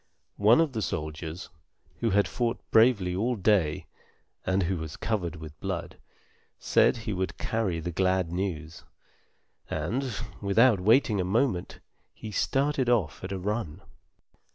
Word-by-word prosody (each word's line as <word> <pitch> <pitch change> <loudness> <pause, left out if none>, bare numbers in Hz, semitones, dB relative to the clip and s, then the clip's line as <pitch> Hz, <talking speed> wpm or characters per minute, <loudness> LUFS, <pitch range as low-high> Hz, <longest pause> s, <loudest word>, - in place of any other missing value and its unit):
One 110 +6 +6
of 160 -4 +2
the 110 - -2
soldiers, 80 0 -4 0.5
who 115 - 0
had 100 0 +3
fought 120 -1 -1
bravely 110 -6 +4
all 120 +6 0
day, 95 -7 +1 0.6
and 95 +1 +1
who 90 +2 -1
was 80 -2 -6
covered 90 -7 -2
with 80 -2 -10
blood, - - -4 0.6
said - - +3
he 110 -2 -4
would 95 0 -3
carry 105 -7 -1
the 85 +2 -4
glad 95 -1 +1
news, 85 -3 -4 0.9
and, 80 - -1 0.4
without 105 +2 +4
waiting 110 -1 +4
a - - 0
moment, 95 -1 0 0.3
he 110 - -8
started 135 +3 +1
off 105 -11 +1
at 95 - -5
a 95 - -2
run. 95 -3 -3
95 Hz, 140 wpm, -28 LUFS, 85-115 Hz, 0.9 s, One